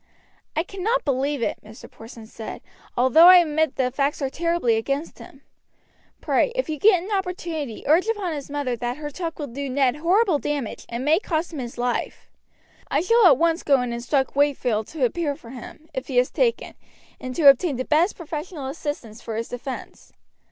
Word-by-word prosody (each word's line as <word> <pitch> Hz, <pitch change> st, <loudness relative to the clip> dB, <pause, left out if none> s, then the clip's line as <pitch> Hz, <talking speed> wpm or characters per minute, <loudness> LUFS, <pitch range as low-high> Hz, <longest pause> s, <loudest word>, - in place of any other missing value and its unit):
"I 320 Hz, -, +1 dB
cannot 415 Hz, +7 st, -2 dB
believe 275 Hz, 0 st, 0 dB
it," -, -, -2 dB
Mr. 215 Hz, +1 st, -12 dB
Porson 225 Hz, 0 st, -12 dB
said, 220 Hz, 0 st, -9 dB, 0.3 s
"although 260 Hz, +8 st, +7 dB
I 365 Hz, 0 st, +10 dB
admit 315 Hz, -3 st, +2 dB
that 255 Hz, -1 st, 0 dB
the -, -, -29 dB
facts 280 Hz, +1 st, 0 dB
are 270 Hz, -2 st, -2 dB
terribly 335 Hz, -8 st, +1 dB
against 275 Hz, +8 st, -3 dB
him. -, -, -14 dB, 0.8 s
Pray, -, -, +1 dB
if -, -, -1 dB
you 305 Hz, -2 st, -3 dB
get 370 Hz, -3 st, +5 dB
an 405 Hz, -, -8 dB
opportunity 345 Hz, -, -3 dB
urge 330 Hz, +8 st, +3 dB
upon 410 Hz, -7 st, -1 dB
his 285 Hz, -2 st, -6 dB
mother 285 Hz, -4 st, -2 dB
that 240 Hz, +2 st, -4 dB
her 295 Hz, -1 st, -6 dB
talk 330 Hz, +1 st, -5 dB
will 295 Hz, -, -4 dB
do 280 Hz, +2 st, -5 dB
Ned 265 Hz, 0 st, +1 dB
horrible 355 Hz, +1 st, +2 dB
damage 285 Hz, -7 st, -4 dB
and 240 Hz, +2 st, -4 dB
may 315 Hz, +4 st, +4 dB
cost 340 Hz, -4 st, -2 dB
him 300 Hz, -, -5 dB
his 240 Hz, -2 st, -6 dB
life. 245 Hz, 0 st, -3 dB, 0.6 s
I 285 Hz, -, +1 dB
shall 460 Hz, +3 st, +5 dB
at 280 Hz, -7 st, +6 dB
once 335 Hz, +2 st, +1 dB
go 280 Hz, -2 st, +3 dB
and 245 Hz, -1 st, -3 dB
instruct 265 Hz, +4 st, -1 dB
Wakefield 255 Hz, -7 st, +1 dB
to 300 Hz, -5 st, -1 dB
appear 290 Hz, +3 st, -1 dB
for 240 Hz, -6 st, -13 dB
him, 265 Hz, +4 st, -11 dB
if 260 Hz, -1 st, -5 dB
he 260 Hz, -, -2 dB
is 250 Hz, 0 st, +3 dB
taken, 475 Hz, -2 st, 0 dB, 0.5 s
and 255 Hz, 0 st, -6 dB
to 310 Hz, -4 st, +4 dB
obtain 275 Hz, +2 st, +6 dB
the 255 Hz, +1 st, -3 dB
best 330 Hz, +6 st, +2 dB
professional 310 Hz, -2 st, -6 dB
assistance 265 Hz, -6 st, -6 dB
for 225 Hz, -, -6 dB
his 230 Hz, +1 st, -4 dB
defense. 250 Hz, +2 st, -8 dB
290 Hz, 195 wpm, -23 LUFS, 255-335 Hz, 0.8 s, I